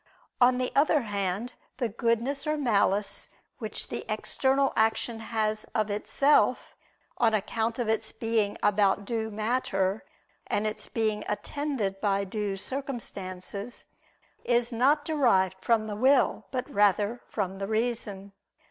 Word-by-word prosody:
On 250 +1 +6
the 255 0 -1
other 295 +1 +4
hand, 205 +2 -2 0.2
the 250 -2 0
goodness 235 +6 -1
or 305 0 +1
malice 210 -6 +1 0.3
which - - -4
the - - -4
external 270 +1 +1
action 225 +1 +1
has 215 -1 -1
of 215 -2 +1
itself, 275 +7 +2 0.4
on 225 -2 +4
account 225 +2 -1
of 240 -3 -1
its 220 0 0
being 220 -2 0
about 200 -1 +3
due 220 0 -2
matter 215 -3 -1 0.4
and 210 - 0
its 215 - -3
being 215 -2 -1
attended 215 -4 -2
by 200 -1 +1
due 200 0 -3
circumstances, 205 -5 -5 0.6
is 240 0 +2
not 280 +6 +3
derived 210 - +2
from 230 -2 +2
the 210 -1 -4
will, 260 +5 +3
but 255 -2 -3
rather 205 +3 +2
from 195 -2 -3
the 195 - -3
reason. 215 -3 -2
220 Hz, 130 wpm, -28 LUFS, 205-245 Hz, 0.6 s, On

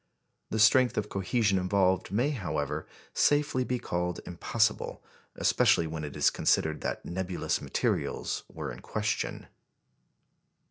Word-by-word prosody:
The 110 - -2
strength 120 +4 +5
of 105 0 -1
cohesion 100 0 +1
involved 95 0 +1
may, 120 +9 +1
however, 80 - -3 0.3
safely 145 -3 +2
be 125 0 -1
called 90 -5 -2
impossible, 105 +5 -1 0.3
especially 85 - +3
when 80 -1 -5
it 75 -2 -6
is - - +4
considered 80 -1 +1
that - - -3
nebulous 90 +1 -2
materials - - -1
were - - -5
in - - -9
question. 105 -1 -2
95 Hz, 125 wpm, -29 LUFS, 85-115 Hz, 0.3 s, strength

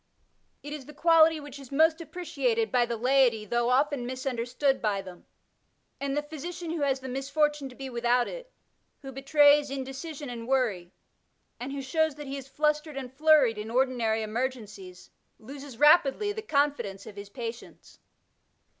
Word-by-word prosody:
It 290 +1 -6
is 285 -4 -8
the 300 - -12
quality 325 0 +5
which 285 -2 -10
is 275 -2 -13
most 320 +3 +3
appreciated 445 +7 -2
by 245 -1 +2
the 235 -1 -3
laity 245 -3 +3
though 240 +3 0
often 270 -1 +1
misunderstood 255 +1 -1
by 200 -3 -1
them; 185 -2 -13 0.7
and 280 0 -2
the 295 - 0
physician 320 +3 -6
who 330 -2 -3
has 270 -2 0
the 260 - -7
misfortune 280 +2 -1
to 250 - -14
be 270 +1 -7
without 240 0 +1
it, - - -9 0.5
who 270 - -7
betrays 290 +2 +4
indecision 275 +3 -6
and 235 -2 -7
worry, 220 -10 0 0.7
and 250 +3 -5
who 275 -1 -5
shows 315 +2 0
that 295 0 -8
he 270 0 -5
is 275 -1 -8
flustered 300 +1 -1
and 260 -2 -6
flurried 285 -6 +4
in 215 +1 -6
ordinary 235 -3 +1
emer 235 +5 -1
gencies, 200 -7 -12 0.3
loses 275 +2 -10
rapidly 300 - +4
the 435 - -5
confidence 280 - -1
of 215 -2 -10
his 200 0 -9
patients. 235 +1 -9
270 Hz, 165 wpm, -28 LUFS, 240-295 Hz, 0.7 s, quality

